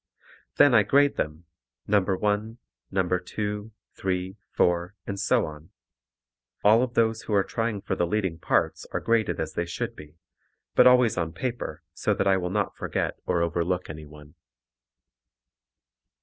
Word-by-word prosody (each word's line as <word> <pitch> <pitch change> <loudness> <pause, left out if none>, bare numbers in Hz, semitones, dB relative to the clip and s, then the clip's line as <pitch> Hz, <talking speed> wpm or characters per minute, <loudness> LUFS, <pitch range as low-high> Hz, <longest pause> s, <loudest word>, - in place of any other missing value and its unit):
Then 145 - +6
I 110 - +7
grade 140 +7 +3
them, 75 +3 -3 0.4
number 100 -2 +2
1, 105 +3 -1 0.3
number 90 -1 +1
2, 105 +3 -4 0.2
3, 95 0 -2
4 90 +2 +1
and 100 0 -4
so - - +2
on. 75 +1 -10 0.9
All 110 +3 +6
of 125 -1 -2
those 110 -1 +2
who 110 -1 -2
are 100 - +4
trying 115 -2 -2
for - - -2
the 85 - 0
leading 95 -3 -1
parts - - 0
are - - 0
graded 115 -1 +1
as - - -3
they 85 - -2
should 85 - -4
be, 75 +2 -13 0.6
but - - +7
always 125 -4 +5
on 80 -1 -2
paper 120 +7 -4
so - - 0
that - - 0
I 95 -1 +4
will 90 -1 -2
not 105 +1 -1
forget - - -3
or 85 -2 +2
overlook 85 +1 -1
anyone. 75 -1 -12
95 Hz, 155 wpm, -26 LUFS, 85-110 Hz, 0.9 s, I